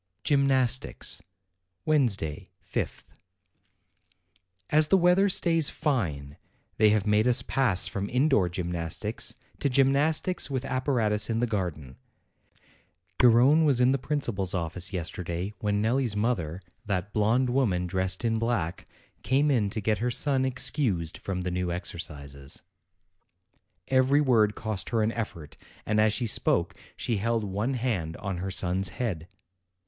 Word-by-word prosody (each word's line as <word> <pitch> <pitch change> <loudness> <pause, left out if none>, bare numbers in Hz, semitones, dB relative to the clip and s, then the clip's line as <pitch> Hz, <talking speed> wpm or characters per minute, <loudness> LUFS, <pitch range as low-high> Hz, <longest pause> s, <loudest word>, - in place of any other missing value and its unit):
GYMNASTICS 135 -3 +1 0.6
Wednesday, 110 - 0 0.2
5th. - - -4 1.6
As 155 0 +5
the 195 - +4
weather 180 +3 +4
stays 165 -4 +2
fine, 75 - -2 0.4
they 110 0 +5
have 105 -2 +2
made 105 +2 +3
us 125 0 +3
pass 120 -10 +1
from 100 0 -4
indoor 125 - +2
gymnastics 85 -2 -4 0.2
to 140 - +1
gymnastics 140 +7 +2
with 135 -1 -3
ap 130 -1 -2
paratus 110 -6 +2
in 115 0 0
the 120 - +2
garden. 85 - -4 1.2
Gar 125 - +7
rone 130 +8 +5
was 140 -5 +3
in 125 +1 +4
the 135 - +1
principal's 120 -11 -2
office 85 +2 -2
yesterday 90 +1 -4
when 105 0 0
Nelli's 120 -1 0
mother, 100 -6 -1 0.2
that 100 -2 -3
blonde 115 +4 +2
woman 105 -9 +1
dressed 95 +3 -1
in 115 -1 +1
black, 110 -8 -2 0.3
came 140 +3 +2
in 110 -7 +1
to 110 - -3
get 105 +1 0
her 120 +3 0
son 130 +1 +2
excused 120 - -1
from 95 -2 -4
the 90 0 -3
new 90 0 -2
exercises. 75 -5 -6 1.2
Every 130 +2 +3
word 115 -7 +3
cost 110 -3 -4
her 115 -2 +1
an 110 - +1
effort; 85 -10 -6 0.3
and 110 0 +2
as 110 0 +4
she 120 +3 -1
spoke, 110 - +1 0.2
she 115 - -1
held 115 +2 0
one 105 +7 -2
hand 105 -10 -2
on 100 -3 -4
her 95 +2 -4
son's 95 0 0
head. 90 -10 -4
110 Hz, 140 wpm, -27 LUFS, 90-130 Hz, 1.6 s, Gar